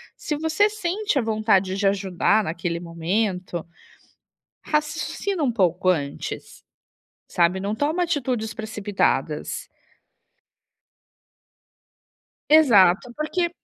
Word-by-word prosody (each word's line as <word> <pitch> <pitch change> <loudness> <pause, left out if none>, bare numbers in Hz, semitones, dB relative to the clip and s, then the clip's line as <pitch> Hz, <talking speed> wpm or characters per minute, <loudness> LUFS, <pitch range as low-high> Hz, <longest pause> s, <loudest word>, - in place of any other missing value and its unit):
Se 300 - -3
você 320 +7 +2
sente 415 -2 -2
a - - +1
vontade 215 -4 +1
de 200 0 +2
ajudar 195 +2 +1
naquele 170 -1 -3
momento, 175 +1 -2 1.0
raciocina 305 +4 -2
um 260 -4 +1
pouco 185 -4 +1
antes, 145 -6 -3 0.7
sabe. 180 +2 +2
Não 200 +2 -2
toma 310 +8 0
atitudes 255 -9 -2
precipitadas. 215 - -2 2.8
Exato, 240 - +5
porque 345 +3 -1
215 Hz, 90 wpm, -23 LUFS, 185-305 Hz, 2.8 s, Exato